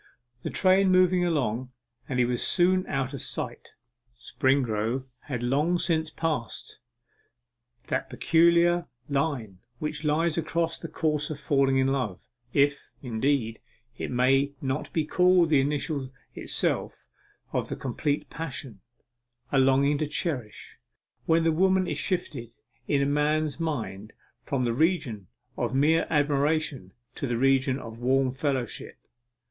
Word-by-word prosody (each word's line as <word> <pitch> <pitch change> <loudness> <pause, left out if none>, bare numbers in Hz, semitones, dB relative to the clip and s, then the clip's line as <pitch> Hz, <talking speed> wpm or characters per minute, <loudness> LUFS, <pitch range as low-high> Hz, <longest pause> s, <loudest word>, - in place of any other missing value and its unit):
The - - -4
train 190 +1 +3
moved 185 0 +5
along, 130 -9 0 0.4
and 125 - -2
he 125 - +4
was 120 0 -1
soon 185 +1 +3
out 135 0 -2
of 140 - -5
sight. - - -5 0.5
Springrove 125 -1 0 0.2
had 125 -5 -4
long 150 +8 +2
since 160 -2 +1
passed 155 -8 -4 1.1
that - - -2
peculiar 170 +1 +3 0.2
line 135 - -2 0.2
which 150 +1 -4
lies 160 +2 +1
across 165 +1 -1
the - - -6
course 150 -2 -1
of 150 -2 -5
falling 135 -2 +2
in 130 - +3
love 130 -9 -1 0.3
if, 140 +1 +1
indeed, 120 -1 0 0.4
it - - -5
may 135 +3 +2
not 130 +1 -3
be 160 -2 0
called 180 0 +4
the 140 -3 +5
initial 140 -1 -2 0.2
itself - - -1 0.5
of - - -1
the - - -3
complete 145 +3 -2
passion 135 -9 -6 0.7
a 135 - +3
longing 135 +2 +3
to 155 - 0
cherish; 140 -8 -3 0.5
when 165 0 +4
the 165 - +3
woman 190 +3 +3
is - - -2
shifted 120 - -2 0.3
in 140 -1 +2
a - - +2
man's 150 +1 0
mind 115 -10 -4 0.3
from 135 -3 -2
the 120 - 0
region 130 - 0 0.3
of 120 +1 -1
mere 155 +4 +3
admiration 145 - +1 0.2
to 140 - -4
the 120 -1 -1
region 135 0 +2
of 115 -3 -9
warm 130 +1 +2
fellowship. 130 -2 -3
140 Hz, 135 wpm, -27 LUFS, 130-160 Hz, 1.1 s, moved